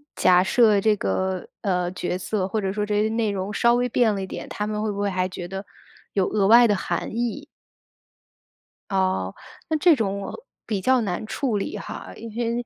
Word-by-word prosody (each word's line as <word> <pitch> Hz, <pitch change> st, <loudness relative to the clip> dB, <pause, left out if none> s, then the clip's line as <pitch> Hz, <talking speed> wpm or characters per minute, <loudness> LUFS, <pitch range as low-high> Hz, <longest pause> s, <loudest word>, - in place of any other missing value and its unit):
假 180 Hz, 0 st, +5 dB
设 210 Hz, +1 st, +4 dB
这 215 Hz, +1 st, +3 dB
个， 185 Hz, -, -1 dB
呃， 180 Hz, -3 st, 0 dB
角 180 Hz, -1 st, -3 dB
色， 190 Hz, 0 st, -2 dB
或 215 Hz, +3 st, -1 dB
者 190 Hz, -1 st, -1 dB
说 210 Hz, +1 st, -1 dB
这 210 Hz, 0 st, +1 dB
些 215 Hz, -, +1 dB
内 225 Hz, -1 st, 0 dB
容 195 Hz, 0 st, -3 dB
稍 235 Hz, +3 st, +4 dB
微 245 Hz, +1 st, +1 dB
变 225 Hz, -2 st, +3 dB
了 195 Hz, -, -3 dB
一 190 Hz, -, -4 dB
点， -, -, -7 dB
他 210 Hz, -, -3 dB
们 210 Hz, 0 st, -2 dB
会 215 Hz, 0 st, -1 dB
不 200 Hz, -, -5 dB
会 205 Hz, 0 st, +1 dB
还 185 Hz, -1 st, 0 dB
觉 180 Hz, -1 st, -7 dB
得 195 Hz, +2 st, -6 dB, 0.5 s
有 195 Hz, -2 st, +2 dB
额 205 Hz, -2 st, +1 dB
外 235 Hz, +3 st, +8 dB
的 205 Hz, -, +2 dB
含 -, -, -2 dB
义？ 240 Hz, +5 st, -2 dB, 1.5 s
哦， 185 Hz, -, 0 dB, 0.4 s
那 315 Hz, -, +2 dB
这 335 Hz, +1 st, +5 dB
种 200 Hz, -5 st, -1 dB
我 325 Hz, -, -7 dB, 0.2 s
比 205 Hz, -4 st, -2 dB
较 260 Hz, +6 st, +4 dB
难 200 Hz, 0 st, -3 dB
处 230 Hz, 0 st, -1 dB
理 195 Hz, -, -3 dB
哈。 -, -, -8 dB
因 230 Hz, -, -8 dB
为 235 Hz, 0 st, -1 dB
205 Hz, 225 characters per minute, -24 LUFS, 190-230 Hz, 1.5 s, 外